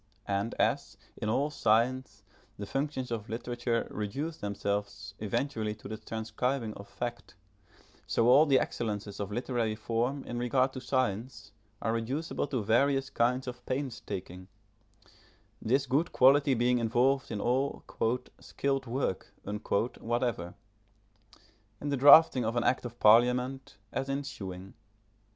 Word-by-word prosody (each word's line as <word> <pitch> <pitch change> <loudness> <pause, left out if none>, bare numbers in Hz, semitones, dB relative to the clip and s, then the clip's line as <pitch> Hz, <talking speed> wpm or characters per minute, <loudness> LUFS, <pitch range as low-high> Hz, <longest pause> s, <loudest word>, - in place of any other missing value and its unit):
And 100 +3 -1
as, - - 0 0.2
in 105 - -3
all 140 +6 +1
science, 115 -3 +1 0.3
the 100 - -5
functions 135 +1 -3
of 110 -2 -4
literature 120 +1 -2
reduce 135 +11 -4
themselves 100 -1 -3
eventually 110 0 -2
to 105 - -11
the 110 - -4
transcribing 110 +2 -3
of 100 -1 -11
fact, 120 -4 -6 0.7
so 115 - +2
all 140 +6 +7
the 135 -2 +5
excellences 105 -3 -3
of 100 0 -4
literary 115 -1 -1
form 120 +5 -1
in 120 - -5
regard 130 +2 +1
to 130 - -6
science 125 -2 -2 0.3
are 115 - +1
reducible 130 +8 -2
to 125 -6 -2
various 135 +5 +2
kinds 125 +2 +1
of 125 -1 -7
pains 130 -2 -2
taking; 95 -2 -7 1.1
this 135 +5 +1
good 140 +6 +1
quality 135 +1 +5
being 120 +1 +2
involved 125 +4 +2
in 110 - -3
all 130 +5 0 0.6
"skilled 135 -1 -2
work" 120 -5 -2 0.7
whatever, 115 -7 -2 1.2
in 145 - -4
the 140 - 0
drafting 140 -1 +8
of 115 +1 -1
an 120 - +1
act 130 - +1
of 120 0 -8
parliament, 125 +3 +3 0.2
as 135 +2 -2
in 140 +1 -1
sewing. 95 -7 -7
120 Hz, 135 wpm, -30 LUFS, 110-135 Hz, 1.2 s, drafting